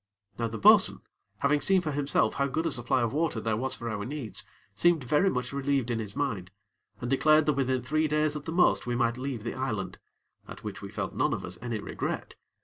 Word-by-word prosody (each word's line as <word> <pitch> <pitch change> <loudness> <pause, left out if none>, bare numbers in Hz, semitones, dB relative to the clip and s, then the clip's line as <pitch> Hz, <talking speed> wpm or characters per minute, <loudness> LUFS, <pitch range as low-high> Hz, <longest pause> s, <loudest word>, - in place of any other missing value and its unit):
Now 115 - 0
the 115 0 -5
bo'sun, 105 - +6 0.4
having 145 +1 +2
seen 190 -1 +4
for 155 -3 -3
himself 140 0 +1
how 140 - 0
good 155 +5 -2
a 165 - +1
supply 120 -2 +1
of 115 - -1
water 155 -5 0
there 110 0 -1
was 130 +3 -1
for 120 - -6
our 105 -3 -3
needs, 130 -2 -3 0.3
seemed 165 +6 +3
very 150 +10 +3
much 125 -2 -3
relieved 140 -3 0
in 115 - -1
his 105 -2 -6
mind, 105 -11 -2 0.5
and 120 - -4
declared 155 +4 +4
that 150 - +3
within 130 -2 0
three 155 +4 +1
days 150 0 +1
at 150 - -6
the 160 - -4
most 175 -6 +3
we 120 - 0
might 120 0 +1
leave 130 -4 -4
the 115 - -3
island, 105 -8 -3 0.5
at - - -10
which - - -6
we - - -7
felt - - -4
none - - +1
of - - -4
us - - -8
any 120 -2 -3
regret. - - -4
130 Hz, 230 wpm, -28 LUFS, 115-150 Hz, 0.5 s, bo'sun